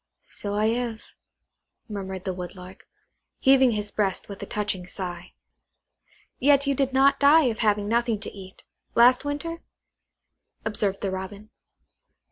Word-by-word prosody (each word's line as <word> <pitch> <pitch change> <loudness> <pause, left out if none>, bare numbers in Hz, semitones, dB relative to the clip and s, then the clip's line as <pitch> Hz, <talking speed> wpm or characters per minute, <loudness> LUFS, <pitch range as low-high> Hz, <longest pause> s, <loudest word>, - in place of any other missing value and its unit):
"So 205 0 -5
I 210 +1 +2
have," 230 -1 -2 0.9
murmured 190 -3 -6
the 190 - -1
Woodlark, 180 +1 -9 0.5
heaving 265 -2 +5
his 210 -1 -3
breast 195 -3 -1
with 200 - -8
a - - -6
touching 205 -4 -3
sigh. 180 -2 -6 1.1
"Yet 280 +1 +4
you 280 - +2
did 270 0 0
not 275 +1 +4
die 295 +3 +6
of 220 - -14
having 205 -2 +1
nothing 230 -1 +1
to - - -5
eat, 190 -1 -12 0.3
last 245 +3 +6
winter?" 330 +4 -4 1.0
observed 205 -3 -1
the 195 - -1
Robin. 200 +3 -7
210 Hz, 135 wpm, -25 LUFS, 195-260 Hz, 1.1 s, die